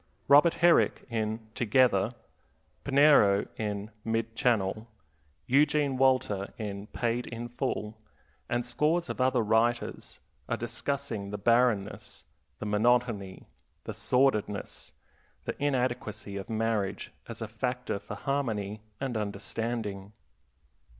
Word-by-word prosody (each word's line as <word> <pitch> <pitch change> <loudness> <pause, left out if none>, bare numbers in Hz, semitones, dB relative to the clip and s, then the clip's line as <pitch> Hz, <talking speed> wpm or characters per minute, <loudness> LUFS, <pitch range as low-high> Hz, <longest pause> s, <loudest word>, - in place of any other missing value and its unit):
Robert 145 +4 +6
Herrick, 175 - +4
in 110 0 -2
Together; 120 -2 +3 0.7
Pinero, 140 -8 +5
in 105 -1 -4
Mid 115 0 -2
Channel; 110 -2 +1 0.6
Eugene 145 +1 +3
Walter, 130 -7 +2
in 100 -1 -5
Paid 120 +1 -2
in 120 0 -5
Full, 110 -3 -3 0.5
and 120 0 0
scores 155 +8 0
of - - -3
other 130 -2 +3
writers 115 +2 0 0.3
are - - 0
discussing 120 -2 -3
the 105 - -4
barrenness, 115 -1 +1 0.3
the - - -6
monotony, 105 -2 +1 0.4
the - - -5
sordidness, 115 -6 0 0.5
the - - -3
inadequacy 125 -7 -1
of 100 -1 -6
marriage 110 -3 -1 0.2
as - - -7
a 115 - -4
factor 125 0 -3
for 100 - -8
harmony 110 -7 -2 0.2
and 135 -3 -3
understanding. 105 0 -3
115 Hz, 110 wpm, -29 LUFS, 105-130 Hz, 0.7 s, Robert